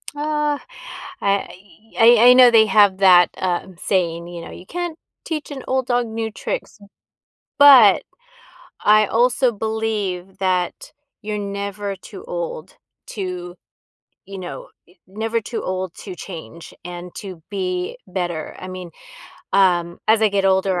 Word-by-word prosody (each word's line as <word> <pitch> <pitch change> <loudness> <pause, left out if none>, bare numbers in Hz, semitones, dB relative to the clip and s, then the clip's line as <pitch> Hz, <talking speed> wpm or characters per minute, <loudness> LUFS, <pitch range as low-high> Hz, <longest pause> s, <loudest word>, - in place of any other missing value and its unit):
Aw, 300 -1 -1 0.6
I 200 0 +2 0.5
y 235 +1 +6
I 240 +2 +8
I 250 - +9
know 250 -1 +7
they 220 -2 +6
have 200 -1 +4
that, 180 -2 +6
uh, 180 0 -2
saying, 170 -3 -1
you 175 -1 -8
know, - - -10
"You 180 - -11
can't 350 -2 -4 0.3
teach 310 -3 -4
an 270 -2 -7
old 260 -1 0
dog 245 -1 +1
new 225 0 -4
tricks." 215 - -5 0.8
But 260 -8 +8 0.8
I 215 0 +5
also 245 +3 +2
believe 210 -4 -3
that 185 -2 -2 0.3
you're 210 0 -3
never 200 0 -4
too 385 - -12
old - - -6 0.3
to, 180 -4 -6 0.7
you 195 0 -9
know, 180 - -8 0.2
y 175 - -23
never 220 +4 -2
too 230 +2 -5
old 185 -1 -3
to 185 -3 -8
change, 170 -2 -10
and 175 0 -8
to 185 -5 -9
be 185 -2 -3
better, 175 -4 -4
I 185 - -8
mean, 185 -2 -8 0.7
um, 175 -3 +2
as 220 0 +4
I 220 - +4
get 200 -1 0
older, 190 -1 +2
200 Hz, 145 wpm, -20 LUFS, 180-230 Hz, 0.8 s, I